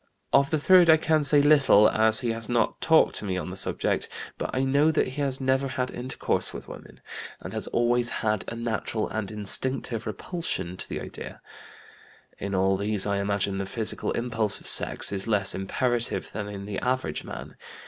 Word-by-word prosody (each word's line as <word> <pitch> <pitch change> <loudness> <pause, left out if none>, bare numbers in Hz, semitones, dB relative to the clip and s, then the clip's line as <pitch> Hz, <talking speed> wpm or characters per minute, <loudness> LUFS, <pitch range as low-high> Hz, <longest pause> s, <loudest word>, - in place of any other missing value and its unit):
Of 140 0 +4
the 155 - +1
third 175 +2 +5
I 160 - +8
can 155 -1 +1
say 145 0 +4
little, 140 -8 +6
as 110 +2 +3
he 120 -2 -1
has 115 0 -2
not 120 -2 0
talked 160 -1 +4
to - - -6
me 95 -2 -2
on 90 - -5
the - - -7
subject; 95 - -1 0.3
but - - -3
I 130 - -1
know 140 +3 +3
that 155 -4 +1
he 140 +3 -5
has 135 -2 0
never 130 +1 +1
had 130 -1 -3
intercourse 125 +2 -3
with - - -8
women, - - -12 0.4
and - - -8
has - - -2
always 120 0 +1
had 110 -3 -1
a - - -5
natural 115 -1 -2
and 110 -3 -4
instinctive 115 +2 -2
repulsion 110 - -4
to - - -7
the - - -4
idea. - - -8 1.0
In 100 0 -3
all 95 +1 +2
these, 100 0 0
I 100 -1 0
imagine, 100 -1 -1
the 100 - -3
physical 110 -1 0
impulse 115 -4 0
of - - -16
sex - - +2
is 100 +2 -3
less 105 -3 +3
imperative 120 +5 -2
than 105 -1 -5
in 100 -1 -7
the 100 -1 -4
average 125 -12 -2
man. - - -9
115 Hz, 195 wpm, -26 LUFS, 100-130 Hz, 1.0 s, I